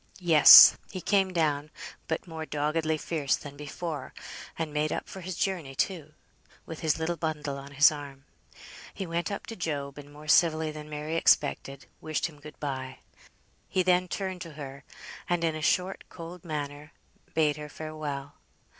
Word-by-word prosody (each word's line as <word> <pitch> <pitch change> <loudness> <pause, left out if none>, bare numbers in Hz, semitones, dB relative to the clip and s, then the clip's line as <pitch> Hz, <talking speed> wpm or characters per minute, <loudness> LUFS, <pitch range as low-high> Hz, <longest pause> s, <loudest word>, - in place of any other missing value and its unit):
Yes, 165 -5 +10
he 185 - -6
came 195 0 +2
down, 155 -4 0 0.4
but 160 - -2
more 160 -2 -6
doggedly 155 +1 -1
fierce 150 -3 -1
than 145 -1 -10
before, 150 0 -6 0.4
and 160 -2 -3
made 150 0 0
up - - -3
for 190 - -9
his 185 0 -5
journey, 165 -8 -2
too; 155 -2 -2 0.5
with 160 - -8
his 160 -1 +1
little 165 +1 -2
bundle 150 -3 -3
on 140 +1 -11
his 145 +2 +7
arm. 140 -2 -9 0.7
He 195 - -4
went 170 +2 -2
up 200 - -5
to 225 - -7
Job, 145 -6 -4
and, 145 0 -12
more 150 +1 -13
civilly 155 0 +3
than 150 0 -9
Mary 150 +2 -3
expected, 140 -3 +1 0.2
wished 155 -1 -2
him 150 -3 -7
good 150 +1 -12
bye. 130 -2 -4 0.7
He 185 - +1
then 180 0 +3
turned 185 0 -4
to 165 -3 -8
her, 140 -2 -9 0.5
and 175 -1 +1
in 165 -1 +1
a 155 - -5
short 180 +4 0
cold 170 0 -10
manner, 150 -1 -6 0.4
bade 155 -2 +2
her 150 0 -8
farewell. 150 -3 -6
155 Hz, 170 wpm, -28 LUFS, 145-170 Hz, 0.7 s, Yes